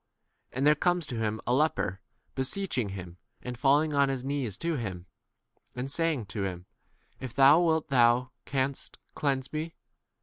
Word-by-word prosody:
40 - - -10
And 135 - +1
there 150 - +7
comes 175 +2 +1
to 125 - -6
him 110 -1 -1
a 120 - +1
leper, 130 -9 +1 0.3
beseeching 130 - -1
him, 90 -3 -8 0.3
and 125 0 -5
falling 145 +4 +3
on 140 -1 +3
his 135 -2 -2
knees 135 -7 -2
to 165 -1 -1
him, 95 -9 -5 0.7
and 130 +2 -4
saying 160 -7 0
to 105 +1 -5
him, 90 -2 -4 0.5
If 130 -2 -7
thou 140 +5 +7
wilt 160 -3 +1
thou 125 -1 +4
canst 135 0 -2 0.2
cleanse 135 -3 0
41 155 +1 -3
me. - - -33
135 Hz, 170 wpm, -29 LUFS, 120-150 Hz, 0.7 s, there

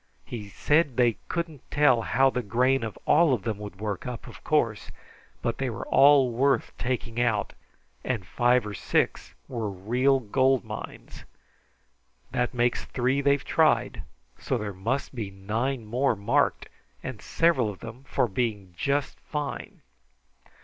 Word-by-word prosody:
He 105 -4 -7
said 145 - +1
they 120 -3 +3
couldn't 165 -5 -3
tell 145 -5 +4
how 135 +4 +3
the 125 - -1
grain 125 +5 +2
of 110 -3 -5
all 165 -6 +5
of 105 - -8
them 110 -3 -3
would 105 -2 -8
work 105 +1 -4
up, 125 -2 -6
of - - -12
course, 115 -9 0 0.5
but 120 -1 -1
they 135 -1 0
were 115 - -5
all 135 -2 +6
worth 135 +4 +1
taking 120 -2 -2
out, 110 -4 0 0.5
and 110 -8 -2
five 120 +4 +2
or 105 - -5
six - - -1
were 115 -5 -3
real 125 +8 +1
gold 130 +2 +2
mines. - - -8 1.1
This 125 0 0
makes 120 0 0
three 130 +2 0
they've 140 -1 +2
tried, - - +2 0.4
so 130 - -1
there 105 -3 -4
must 115 +11 -2
be 110 -6 -4
nine 110 +6 -2
more 125 +3 +1
marked, 120 +8 +1 0.4
and 120 -6 -6
several 150 -9 +2
of 100 - -9
them 115 +3 -9
for 125 - +1
being 105 -4 -2
just 140 +4 -1
fine." 150 -2 -5
120 Hz, 150 wpm, -27 LUFS, 110-135 Hz, 1.1 s, all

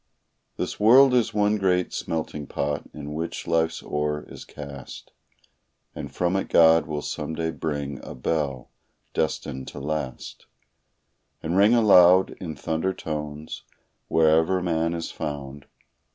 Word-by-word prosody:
This - - -4
world 125 +5 +7
is 120 -3 +2
one 105 0 +2
great 90 -2 +1
smelting 75 -3 -4
pot 70 +1 -3
in 75 -1 -7
which 80 +2 -4
life's 80 0 0
ore 75 0 -2
is - - -10
cast, 70 -3 -10 0.8
And - - -7
from 90 +1 0
it 95 - -1
God 80 -2 +5
will 75 -1 -4
some 80 - -4
day 80 0 -2
bring 70 -4 -4
a - - -8
bell, 70 -1 -2 0.4
destined 65 -3 -2
to - - -8
last 70 -3 -5 1.0
And 80 +3 -1
ring 105 +5 +5
aloud 95 -5 +6
in 80 -4 -5
thunder 80 +6 -2
tones 75 0 -6 0.5
wherever 80 +3 +3
man 85 -1 0
is 85 -1 -5
found. 70 -2 -6
80 Hz, 135 wpm, -25 LUFS, 75-90 Hz, 1.0 s, world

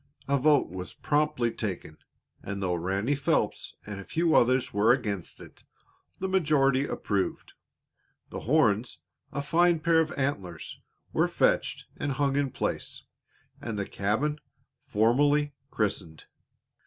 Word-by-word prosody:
A 140 0 +2
vote 145 - +3
was 90 0 -7
promptly 145 -5 +1
taken, 95 -9 -5 0.4
and 100 0 -5
though 95 -2 0
Ranny 95 +9 0
Phelps 140 -1 0
and 105 -1 -6
a - - -7
few 165 - +1
others 130 +1 +3
were 105 +3 +4
against 105 -8 -2
it, - - -13 0.5
the 190 - -2
majority 145 -7 +3
approved. 100 -2 -2 0.8
The - - -5
horns, 120 -5 +2 0.3
a 140 - -3
fine 170 +2 +3
pair 165 0 +3
of 160 -1 +1
antlers, 95 - -3 0.3
were - - +3
fetched - - +1
and 145 -1 -2
hung 140 0 0
in 140 -1 +1
place, - - -4 0.6
and 115 -3 -4
the 100 - -1
cabin 120 +12 -1 0.5
formally 145 +6 +3 0.2
christened. 95 -9 -2
130 Hz, 130 wpm, -28 LUFS, 100-145 Hz, 0.8 s, were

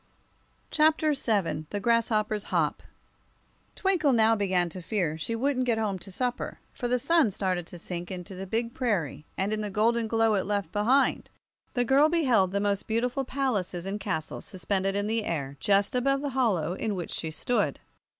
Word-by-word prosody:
Chapter 310 0 +3
VII 195 - -1
The 205 - -3
Grasshoppers' 215 -2 +1
Hop - - 0 0.9
TWINKLE 360 -8 +2
now 225 -1 +5
began 185 -4 +1
to 180 +2 -8
fear 175 -4 -1
she 160 +9 -3
wouldn't 255 +1 0
get 230 -2 +2
home 205 -4 -1
to 195 - -11
supper, 245 +5 -2 0.2
for 245 - -3
the 250 +1 +2
sun 295 0 +3
started 185 -3 -2
to 175 - -9
sink 175 0 -5
into 185 0 -7
the 190 +1 -6
big 230 +4 -2
prairie, 175 - -1
and 200 +3 0
in 215 - -1
the 210 - -3
golden 225 +3 +1
glow 225 0 +2
it 195 -2 0
left 205 -1 -1
behind, 250 +6 +2 0.5
the 245 -1 +2
girl 275 +5 +5
beheld 230 - +2
most 200 -1 -1
beautiful 245 +4 0
palaces 215 -10 -2
and 200 +2 -3
castles 185 -6 -3
suspended 195 +1 -1
in 205 0 0
the 220 +1 0
air 140 -7 -3
just 200 +3 +2
above 275 +2 +1
the 285 - -2
hollow 210 - +1
in 205 +2 -2
which 175 -2 -5
she 160 - -3
stood. 240 +10 0
210 Hz, 180 wpm, -28 LUFS, 190-245 Hz, 0.9 s, now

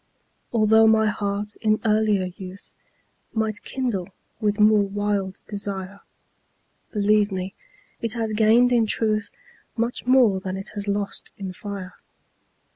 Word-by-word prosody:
Altho' 220 -1 +5
my 220 0 +5
heart 205 0 -2
in 215 0 +1
earlier 215 -3 +2
youth 190 0 -11 0.6
Might 220 -1 -1
kindle 235 -9 -3 0.3
with 210 -2 0
more 210 0 +6
wild 200 -1 -2
desire, 200 -1 -4 0.9
Believe 210 0 +2
me, 190 0 -4 0.5
it 230 -2 -1
has 225 -2 -2
gained 225 +3 +5
in 235 -2 +3
truth 215 0 0 0.5
Much 235 +1 -2
more 245 -7 +5
than 185 0 -4
it 195 +2 -5
has 205 -1 -4
lost 200 0 -2
in 190 -2 -5
fire. 200 -2 -7
210 Hz, 125 wpm, -24 LUFS, 200-220 Hz, 0.9 s, more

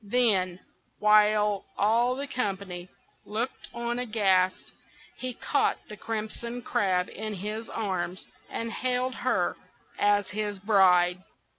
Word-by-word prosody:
Then, 200 -5 +2 0.4
while 210 -1 +4
all 235 +4 +3
the 280 +2 -3
company 195 -8 -3 0.3
looked 230 +5 -3
on 235 +1 -2
aghast, 195 -6 +1 0.5
he 255 0 -2
caught 280 - +1
the 210 - -6
Crimson 230 +3 -5
Crab 185 -4 +1
in 215 0 -5
his 210 +4 -5
arms, 190 -4 -3 0.2
and 230 0 -3
hailed 255 +1 0
her - - 0 0.4
as 205 -1 +3
his 205 0 -2
bride. 185 -3 +4
210 Hz, 115 wpm, -28 LUFS, 190-235 Hz, 0.5 s, while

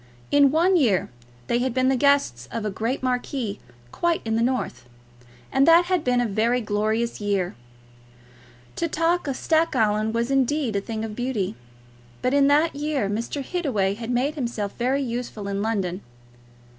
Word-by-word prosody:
In 285 -1 +6
one 345 +6 +3
year 220 - +2 0.3
they 235 - +1
had 255 -1 -1
been 255 0 +2
the 265 - +3
guests 255 - +2
of 225 -2 -3
a 210 - -1
great 230 +7 -2
marquis 250 -4 -2 0.3
quite 340 -1 0
in 220 0 0
the 225 - +1
north, 230 - -2 0.6
and 270 +2 +3
that 335 +1 +7
had 360 -3 0
been 250 -1 +2
a 245 - +2
very 230 +3 +1
glorious 220 +1 -1
year. 200 -3 0 1.2
To 335 - 0
talk 330 +1 0
of 275 - -1
Stackallan 225 -10 +1
was, 235 +3 -1
indeed, 270 -3 +1
a 200 - +1
thing 220 +1 -4
of 215 -1 -7
beauty. 245 - -2 0.7
But 250 - +1
in 280 -1 +5
that 300 +3 +3
year 290 -6 -1
Mr. 235 +7 -3
Hittaway 255 - 0
had 230 +2 -7
made 250 +4 +1
himself 235 -8 -3
very 260 +3 0
useful 235 -4 -4
in 200 0 -2
London. 195 -4 -1
245 Hz, 170 wpm, -24 LUFS, 215-280 Hz, 1.2 s, that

